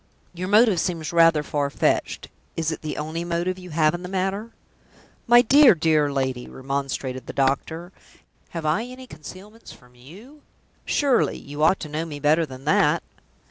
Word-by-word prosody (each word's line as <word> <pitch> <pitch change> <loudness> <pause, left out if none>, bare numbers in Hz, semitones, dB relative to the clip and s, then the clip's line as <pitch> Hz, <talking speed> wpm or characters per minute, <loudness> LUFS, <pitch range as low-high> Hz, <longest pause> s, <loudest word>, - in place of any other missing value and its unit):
"Your 180 +1 -5
motive 210 -2 +4
seems 165 -2 -3
rather 165 -2 +5
far 145 -1 -2
fetched. - - -1 0.3
Is 165 -1 -1
it 160 - -6
the 155 - -5
only 160 +3 -4
motive 175 +2 -2
you 180 0 -11
have 155 -1 +2
in 175 - -5
the 180 - -7
matter?" 195 +4 -2 0.8
"My 240 +1 +7
dear, 275 -2 +7
dear 155 -3 +2
lady!" 130 -3 -2
remonstrated 135 -1 -4
the - - -6
doctor, 160 +6 -1 0.6
"have 165 -2 -6
I 155 +9 +1
any 255 +1 -10
concealments 200 +4 -12
from 125 -1 -18
you? 195 - -15 0.4
Surely, 275 -4 +1
you 145 +1 -8
ought 160 +5 +4
to - - -5
know 155 +2 -3
me 150 -3 -7
better 155 +3 +2
than 130 0 -11
that?" - - +2
165 Hz, 170 wpm, -23 LUFS, 145-190 Hz, 0.8 s, My